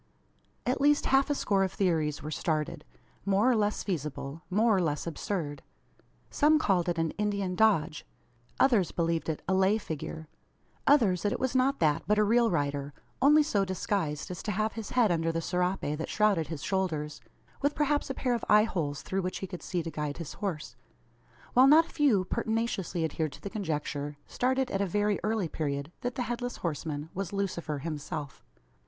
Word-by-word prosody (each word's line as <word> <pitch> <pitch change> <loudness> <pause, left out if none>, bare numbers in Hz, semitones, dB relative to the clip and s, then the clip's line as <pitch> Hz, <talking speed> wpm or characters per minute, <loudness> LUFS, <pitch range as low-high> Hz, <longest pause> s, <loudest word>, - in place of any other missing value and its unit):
At 255 +2 0
least 290 +1 +4
half 270 +1 +3
a 290 - +1
score 195 -7 +1
of 190 - -1
theories 160 -7 0
were 155 - -5
started 155 0 -2 0.4
more 200 +4 +2
or - - +3
less 210 -1 0
feasible 150 -4 -4
more 215 +3 +3
or - - +2
less 150 -4 -1
absurd. 160 -4 -3 0.7
Some 310 +1 +4
called 185 - +1
it 170 - -1
an 165 -1 0
"Indian 200 -3 0
dodge;" 180 -7 +2 0.6
others 230 - +4
believed 165 -1 -1
it 155 - -3
a 190 - +2
"lay 190 +3 +4
figure;" 160 -4 -6 0.6
others 215 - +4
that 205 - 0
it - - -2
was 260 0 -1
not 265 +2 +3
that, 150 -2 +3
but 210 +1 +3
a 210 - +5
real 230 +2 +4
rider, 145 -3 -2 0.3
only 300 +3 +6
so 210 -10 +1
disguised 185 -5 -2
as 180 - -6
to 210 - -3
have 215 +2 0
his 225 -2 -6
head 235 -6 +3
under 165 -1 +1
the 165 - -1
serape 180 +3 0 0.2
that 160 - -4
shrouded 205 -7 +2
his 160 -4 -6
shoulders, 160 -6 -2 0.4
with 285 +1 +1
perhaps 295 -1 +1
a 270 - -3
pair 250 -2 0
of 235 - -2
eye 210 0 +7
holes 155 -9 -2
through 195 +1 -1
which 185 0 -3
he - - -4
could 180 -2 -8
see 175 -3 -2
to 165 - -5
guide 150 -2 -3
his 170 -3 -6
horse; 170 - -4 0.8
while 255 +2 +7
not 315 +3 +7
a - - -17
few 245 -11 +3
pertinaciously 220 -6 -1
adhered 155 -1 -2
to - - -12
the 200 - -6
conjecture, 150 -7 -3
started 260 +1 0
at 195 - 0
a 200 - +1
very 205 +2 +1
early 215 -3 0
period, 140 -1 -3
that 245 0 -3
the 255 - -1
Headless 245 +1 -3
Horseman 155 -1 -4
was 195 -2 -4
Lucifer 175 -6 -2
himself! 145 -1 -5
190 Hz, 190 wpm, -29 LUFS, 160-220 Hz, 0.8 s, eye